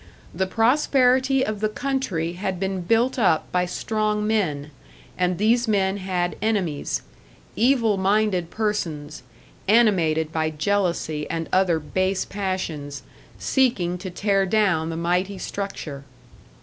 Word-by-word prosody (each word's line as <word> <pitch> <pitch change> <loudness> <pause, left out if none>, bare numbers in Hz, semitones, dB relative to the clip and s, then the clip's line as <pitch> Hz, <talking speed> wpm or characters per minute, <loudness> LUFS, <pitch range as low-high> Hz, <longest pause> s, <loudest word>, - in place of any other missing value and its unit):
The 190 +3 -1
prosperity 260 +3 +3
of 215 -1 -3
the 215 +1 0
country 215 -10 -2
had 185 0 -3
been 190 -1 -2
built 230 +8 +1
up 180 -8 +2
by 180 0 +1
strong 215 +2 -1
men; 155 -10 -1 0.4
and 180 -1 0
these 235 +4 +2
men 195 -2 +1
had 180 -2 -2
enemies 195 -9 -1 0.5
evil 230 -3 +3
minded 190 -3 +1
persons, 170 -11 -3 0.5
animated 175 -8 +3
by 160 -1 0
jealousy 160 -2 -1
and 165 -1 -3
other 185 -3 +3
base 185 +5 -1
passions, 170 -8 -4 0.3
seeking 190 -10 +1
to 185 +1 -6
tear 195 +1 +1
down 185 -6 +2
the 165 - -4
mighty 180 +4 0
structure. 175 -9 -5
190 Hz, 125 wpm, -23 LUFS, 170-215 Hz, 0.5 s, prosperity